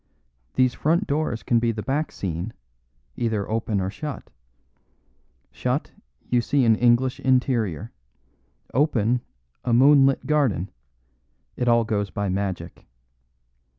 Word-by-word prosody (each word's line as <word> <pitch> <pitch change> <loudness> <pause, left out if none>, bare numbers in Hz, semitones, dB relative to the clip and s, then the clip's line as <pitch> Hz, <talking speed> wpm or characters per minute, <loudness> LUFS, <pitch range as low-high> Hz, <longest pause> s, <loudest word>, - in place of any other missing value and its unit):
These 130 -1 +3
front 170 +9 +1
doors 145 -6 -1
can 120 - +2
be 115 0 +1
the 110 -2 -5
back 145 +3 -1
scene, 90 +4 -4 0.6
either 110 -4 -1
open 110 -2 -1
or 95 0 -2
shut. 150 +4 -7 1.2
Shut, - - -2 0.4
you 120 -1 +2
see 135 +1 +1
an 115 -1 +5
English 120 +2 +2
interior. 120 - 0 0.8
Open, 125 -4 +2 0.4
a 120 - 0
moonlit 135 +2 +5
garden. 130 - +1 0.8
It 125 - -2
all 115 -1 +4
goes 105 -3 -1
by 100 +1 -3
magic." 95 -3 -4
120 Hz, 115 wpm, -24 LUFS, 105-135 Hz, 1.2 s, an